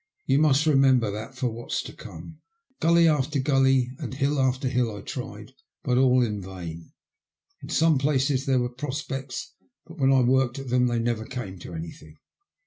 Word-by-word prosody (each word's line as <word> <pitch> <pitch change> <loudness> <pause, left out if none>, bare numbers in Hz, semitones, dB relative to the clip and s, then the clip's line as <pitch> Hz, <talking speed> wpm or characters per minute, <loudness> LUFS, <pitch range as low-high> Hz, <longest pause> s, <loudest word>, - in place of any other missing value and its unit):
You 135 +1 +3
must 150 -1 +3
remem 135 -4 +5
ber 110 -3 -2
that 110 +6 -7
for 125 -1 -1
what's 115 +1 -4
to - - -9
come. 85 - -11 0.4
Gully 170 +1 +4
after 150 -1 +1
gully, 135 -2 +2
and - - -5
hill 140 +1 0
after 130 0 +1
hill 125 -4 0
I 100 - -8
tried, - - -7 0.3
but 125 0 +2
all 130 -1 +4
in 105 -3 -2
vain. 90 - -8 0.7
In - - -10
some 160 -3 +3
places 140 -1 +1
there 135 -1 +3
were 125 -1 0
prospects, 135 0 -5 0.3
but 165 0 -13
when 135 -1 +4
I 135 -1 +5
worked 130 0 +2
at 135 -2 -6
them 125 0 +3
they 120 -1 0
never 115 -1 -1
came 110 -8 -6
to 85 - -9
anything. 80 -1 -9
130 Hz, 185 wpm, -25 LUFS, 120-135 Hz, 0.7 s, remem